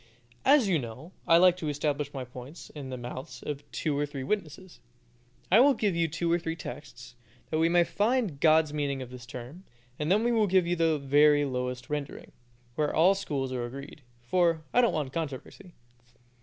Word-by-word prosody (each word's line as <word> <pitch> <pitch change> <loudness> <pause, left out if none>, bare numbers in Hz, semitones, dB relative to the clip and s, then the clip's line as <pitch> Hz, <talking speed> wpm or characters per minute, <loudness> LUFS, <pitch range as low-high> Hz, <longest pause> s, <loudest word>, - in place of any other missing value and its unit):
As 275 -5 +5
you 175 -5 +2
know, 125 +7 -8 0.2
I 165 - +7
like 180 0 +6
to 160 -4 -3
establish 145 0 -2
my 135 -3 -5
points 130 +6 -11
in 140 -3 -8
the 130 - -5
mouths 125 +2 -8
of 145 -1 -5
two 155 -3 -2
or 145 +1 0
three 140 -2 -6
witnesses, 185 0 -4 0.7
I 205 - +7
will 275 +2 +6
give 205 -5 0
you 170 -1 +1
two 165 +2 -2
or 170 - +3
three 165 -1 -4
texts, - - -9 0.4
that 155 - 0
we 165 +1 +3
may 175 0 +4
find 220 +3 0
out 140 - -14
God's 155 -1 +4
meaning 140 -3 -2
of 125 - -12
this 125 -2 -10
term, 125 +9 -9 0.4
and 150 +3 -1
then 210 +3 +3
we 240 - +2
will 220 -3 +3
give 185 -1 +3
you 175 +1 0
the 165 -2 +2
very 145 +1 +4
lowest 125 -2 -4
rendering, 145 -2 -5 0.4
where 150 +3 0
all 175 +5 +5
schools 140 -9 -3
are 125 -2 -2
agreed, 140 +4 -10 0.2
for 165 +4 +1
I 245 - +5
don't 235 - +3
want 145 -4 -3
controversy. 165 +4 -6
150 Hz, 200 wpm, -28 LUFS, 135-175 Hz, 0.7 s, I